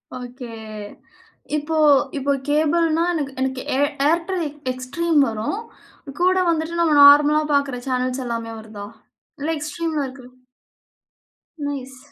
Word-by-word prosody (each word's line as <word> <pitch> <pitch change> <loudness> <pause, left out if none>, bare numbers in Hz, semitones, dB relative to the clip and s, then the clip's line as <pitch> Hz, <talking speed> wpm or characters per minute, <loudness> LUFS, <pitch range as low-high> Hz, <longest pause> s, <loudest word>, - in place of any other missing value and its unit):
Okay. 245 -2 -8 1.0
இப்போ 300 +2 -2 0.4
இப்போ 280 +1 0 0.2
கேபிள்ன்னா 320 +2 +2
எனக்கு 285 -5 -2
எனக்கு 260 0 -1 0.2
ஏர் 285 +1 +2 0.2
Airtel 345 +2 0 0.3
Extreme 295 +6 0
வரும். 220 - -3 0.6
கூட 370 +1 +4
வந்துட்டு 330 +1 -1
நம்ம 320 -3 +3
நார்மலா 295 +1 +7
பார்க்குற 280 -3 +1
சேனல்ஸ் 255 0 -1
எல்லாமே 230 -1 -4
வருதா? 215 -2 -9 0.5
இல்ல 300 +3 -3
Extremeல 310 -1 -2
இருக்கது 255 -1 -12 1.3
நைஸ் 265 -2 -5
285 Hz, 110 wpm, -21 LUFS, 255-320 Hz, 1.3 s, நார்மலா